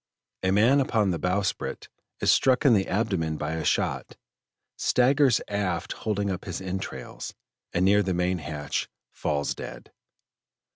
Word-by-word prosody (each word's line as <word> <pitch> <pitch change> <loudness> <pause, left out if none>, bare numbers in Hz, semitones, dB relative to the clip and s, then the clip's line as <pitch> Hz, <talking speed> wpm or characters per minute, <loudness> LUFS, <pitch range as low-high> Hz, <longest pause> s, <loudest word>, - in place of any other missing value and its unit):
A 95 - +1
man 115 +8 +5
upon 110 -7 +2
the 85 - -2
bowsprit 90 +3 -1 0.3
is - - +5
struck 130 +2 +3
in 130 - +7
the 95 -3 +2
abdomen 90 -6 0
by 75 +1 -3
a 80 -1 -3
shot, - - -1 0.6
staggers 130 0 +3
aft 95 -5 -2
holding 100 -2 -2
up 90 - -5
his 90 -3 -4
entrails, 95 0 -6 0.4
and 90 +1 +1
near 100 +2 +5
the 95 -2 -1
main 90 +1 0
hatch 75 -2 -3 0.2
falls 70 -1 -1
dead. - - -9
95 Hz, 145 wpm, -26 LUFS, 85-105 Hz, 0.6 s, in